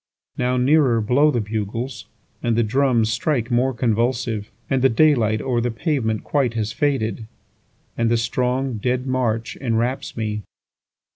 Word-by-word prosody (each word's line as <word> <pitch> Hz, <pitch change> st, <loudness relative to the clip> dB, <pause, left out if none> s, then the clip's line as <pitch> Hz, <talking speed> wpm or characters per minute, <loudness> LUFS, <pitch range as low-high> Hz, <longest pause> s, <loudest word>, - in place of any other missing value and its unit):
6Now 125 Hz, 0 st, +1 dB
nearer 130 Hz, -3 st, +4 dB
blow 125 Hz, +8 st, +3 dB
the 120 Hz, -6 st, 0 dB
bugles, 110 Hz, +3 st, -4 dB, 0.3 s
And 120 Hz, -2 st, +1 dB
the 115 Hz, -, +3 dB
drums 120 Hz, -1 st, +2 dB
strike 125 Hz, 0 st, -1 dB
more 125 Hz, +2 st, +2 dB
convulsive; 115 Hz, -2 st, -1 dB, 0.2 s
And 135 Hz, -2 st, +1 dB
the 135 Hz, -, +5 dB
day 150 Hz, +6 st, +5 dB
light 110 Hz, -4 st, 0 dB
o'er 125 Hz, -3 st, 0 dB
the 120 Hz, -, 0 dB
pavement 115 Hz, -3 st, -1 dB
quite 130 Hz, -5 st, 0 dB
has 110 Hz, -1 st, -1 dB
faded, 120 Hz, -7 st, -1 dB, 0.7 s
And 115 Hz, -1 st, +1 dB
the 120 Hz, -, +3 dB
strong 125 Hz, +2 st, -1 dB
dead 125 Hz, +3 st, -1 dB
march 125 Hz, -3 st, -1 dB
enwraps 120 Hz, +1 st, -2 dB
me. 105 Hz, -1 st, -2 dB
120 Hz, 150 wpm, -22 LUFS, 110-130 Hz, 0.7 s, the